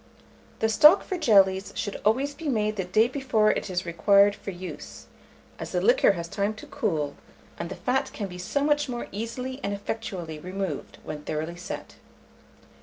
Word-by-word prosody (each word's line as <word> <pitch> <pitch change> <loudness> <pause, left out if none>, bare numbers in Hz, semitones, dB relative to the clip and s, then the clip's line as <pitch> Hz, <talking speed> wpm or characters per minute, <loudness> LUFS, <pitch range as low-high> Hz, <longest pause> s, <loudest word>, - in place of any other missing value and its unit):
The 220 - +4
stock 300 - +7
for 375 - -3
jellies 195 - +3
should 205 - -4
always 265 +7 +2
be 305 +1 -5
made 215 -4 0
the 195 - -1
day 215 +5 +3
before 255 -5 +2
it - - -3
is 180 -1 -2
required 200 +4 +4
for 200 - -8
use, 185 -1 -8 0.5
as - - -6
the - - +2
liquor - - +4
has 170 -2 -5
time 200 +4 -1
to - - -10
cool, 155 -9 -2 0.4
and 170 - -4
the 190 - -5
fat 265 +2 0
can 210 - -4
be 180 -1 -9
so 280 +10 -1
much 295 -1 +2
more 240 -1 -3
easily 250 +5 -5
and 200 - -2
effectually 180 -6 -5
removed 185 -2 -5
when 150 -1 -6
thoroughly 155 +3 -4
set. 180 +2 -7
205 Hz, 180 wpm, -26 LUFS, 180-250 Hz, 0.5 s, stock